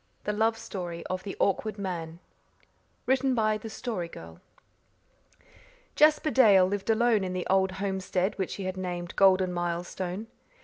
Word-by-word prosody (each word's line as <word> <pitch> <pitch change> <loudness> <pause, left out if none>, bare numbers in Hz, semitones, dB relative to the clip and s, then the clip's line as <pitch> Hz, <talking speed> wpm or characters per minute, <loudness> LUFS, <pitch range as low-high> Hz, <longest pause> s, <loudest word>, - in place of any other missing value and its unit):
THE 210 - -1
LOVE 225 +2 +1
STORY 175 -6 -6
OF 185 0 -2
THE 200 - -7
AWKWARD 210 +2 0
MAN 170 -4 -5 0.9
(Written 265 0 +2
by 215 -2 +1
the 225 - -8
Story 215 -6 -4
Girl) 80 - -12 1.5
Jasper 305 0 +4
Dale 205 -9 +6
lived 195 +2 -3
alone 225 -2 +3
in 185 -1 -3
the 180 -1 -3
old 190 -1 +3
homestead 190 0 -1
which 190 - -2
he 195 - -6
had 185 0 -4
named 175 -2 -5
Golden 185 -2 +4
Milestone. 175 +3 -3
190 Hz, 145 wpm, -28 LUFS, 180-215 Hz, 1.5 s, Dale